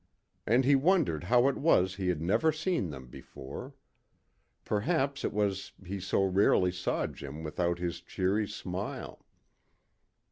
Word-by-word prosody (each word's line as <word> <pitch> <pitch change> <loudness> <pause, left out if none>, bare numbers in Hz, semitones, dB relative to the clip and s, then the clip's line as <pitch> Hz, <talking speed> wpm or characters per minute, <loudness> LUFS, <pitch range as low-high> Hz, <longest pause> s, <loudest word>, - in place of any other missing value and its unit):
And 120 +4 +4
he 140 - +5
wondered 140 - +2
how 120 +6 +4
it 140 - 0
was 95 - +3
he 95 -2 -2
had 85 -3 0
never 130 - +3
seen 155 - -1
them 65 -3 -8
before. 65 +2 -10 0.9
Perhaps 140 +6 0
it - - 0
was 100 -2 -1
that 95 - -16
he 100 0 -3
so 95 +1 +1
rarely 95 -1 +3
saw 90 0 -1
Jim 75 +3 -7
without 85 +2 -1
his 85 -1 -4
cheery 100 +3 0
smile. 100 -2 -6
95 Hz, 145 wpm, -30 LUFS, 90-130 Hz, 0.9 s, he